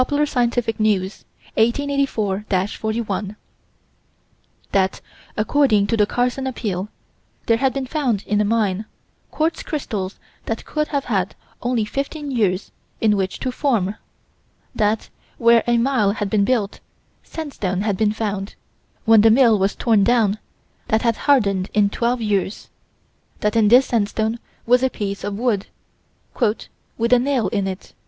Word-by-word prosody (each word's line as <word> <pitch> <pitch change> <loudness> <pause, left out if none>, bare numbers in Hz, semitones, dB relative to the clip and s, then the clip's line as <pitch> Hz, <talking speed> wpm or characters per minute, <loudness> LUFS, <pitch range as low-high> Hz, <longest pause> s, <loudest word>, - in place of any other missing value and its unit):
Sci. - - +3
News_, 225 -8 0 0.3
1884 235 -5 0 0.2
41: 215 -2 -3 1.4
That, 190 -1 +1 0.4
according 220 -2 +3
to 215 - 0
the 210 -2 +3
Carson 250 +3 -1
Appeal, 210 -6 -3 0.6
there 230 - +3
had 265 +2 +2
been 270 0 -3
found 255 -7 -1
in 210 0 +1
a - - +3
mine, 210 -2 0 0.4
quartz 320 +2 -1
crystals 210 - -4 0.3
that 225 - -3
could 305 0 -1
have 280 -2 -2
had 195 -4 -1 0.3
only 240 -3 0
15 280 +5 -4
years 205 -6 0 0.3
in 215 -2 +3
which 190 -1 -2
to 260 - -1
form: 235 -8 0 0.8
that, 215 0 0 0.3
where 235 0 +5
a 240 0 +3
mill 230 -5 +2
had 205 -2 -3
been 205 -2 +3
built, 215 -4 0 0.4
sandstone 210 - -4
had 205 -1 0
been 210 +1 +2
found, 205 -2 -3 0.5
when 225 -2 +7
the 225 - +6
mill 230 -2 +5
was 195 +1 +1
torn 220 -4 +3
down, 220 -2 +2 0.5
that 220 +1 +1
had 230 -2 +2
hardened 200 -9 +3
in 205 -1 +3
12 240 +2 0
years: 205 -2 -1 0.7
that 210 +1 0
in 220 -2 +4
this 250 +5 +6
sandstone 220 0 -1 0.3
was 245 +1 +4
a 260 - +2
piece 200 -4 -4
of 205 -1 -3
wood 225 -4 0 1.3
"with 235 +2 +2
a 250 - +6
nail 250 -6 0
in 200 -1 -1
it." 190 0 -7
220 Hz, 145 wpm, -21 LUFS, 205-250 Hz, 1.4 s, when